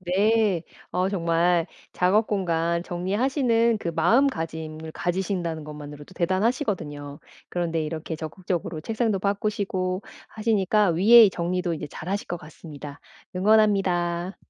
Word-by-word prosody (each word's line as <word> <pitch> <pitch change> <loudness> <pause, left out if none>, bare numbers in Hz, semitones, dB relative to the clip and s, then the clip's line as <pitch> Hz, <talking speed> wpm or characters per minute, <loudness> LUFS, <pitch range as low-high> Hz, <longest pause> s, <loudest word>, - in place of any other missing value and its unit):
네. 195 0 +2 0.3
어 180 +1 0
정말 170 -2 +1 0.3
작업 200 +5 +3
공간 170 -4 0
정리하시는 230 - +1
그 170 - -4
마음가짐을 160 - 0
가지신다는 175 -3 -2
것만으로도 150 +1 -10
대단하시거든요. 180 - -1 0.3
그런데 165 -2 -1
이렇게 155 +1 -4
적극적으로 165 0 -4
책상도 220 0 0
바꾸시고 200 -2 -1 0.3
하시니까 210 -3 +2
위에 215 +5 +7
정리도 180 0 -2
인제 155 - -5
잘 155 - -8
하실 200 +1 -2
것 175 - -2
같습니다. 150 -2 -11 0.3
응원합니다. 190 -3 +2
180 Hz, 325 characters per minute, -25 LUFS, 165-205 Hz, 0.3 s, 위에